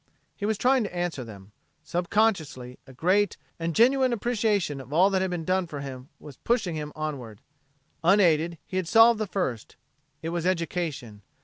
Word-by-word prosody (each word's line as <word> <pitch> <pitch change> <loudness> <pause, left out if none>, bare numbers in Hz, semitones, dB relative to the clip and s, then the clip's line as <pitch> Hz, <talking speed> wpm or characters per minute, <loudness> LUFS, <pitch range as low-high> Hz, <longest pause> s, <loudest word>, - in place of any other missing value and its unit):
He 205 - -3
was 220 -1 0
trying 255 +2 +3
to 195 -3 -6
answer 175 -6 -2
them. 100 -3 -12 0.3
Subconsciously, 170 - -1
a 135 - -13
great 190 +9 +1 0.2
and 165 0 -2
a - - -3
genuine 255 - +4
appreciation 210 - 0
of 130 - -14
all 180 +6 +4
that 190 -1 +1
had 190 - 0
been 175 -3 -4
done 185 0 +1
for 145 -3 -6
him 135 -1 -8
was 145 -4 -12
pushing 225 -7 0
him 150 -1 -5
onward. 135 -9 -5 0.6
Unaided, 170 -3 +3
he 185 - -5
had 185 -3 -1
solved 225 +2 +6
the 215 - -1
first. 135 - -3 0.5
It 165 - -2
was 170 -1 -2
education. 165 - -2
175 Hz, 180 wpm, -26 LUFS, 145-205 Hz, 0.6 s, solved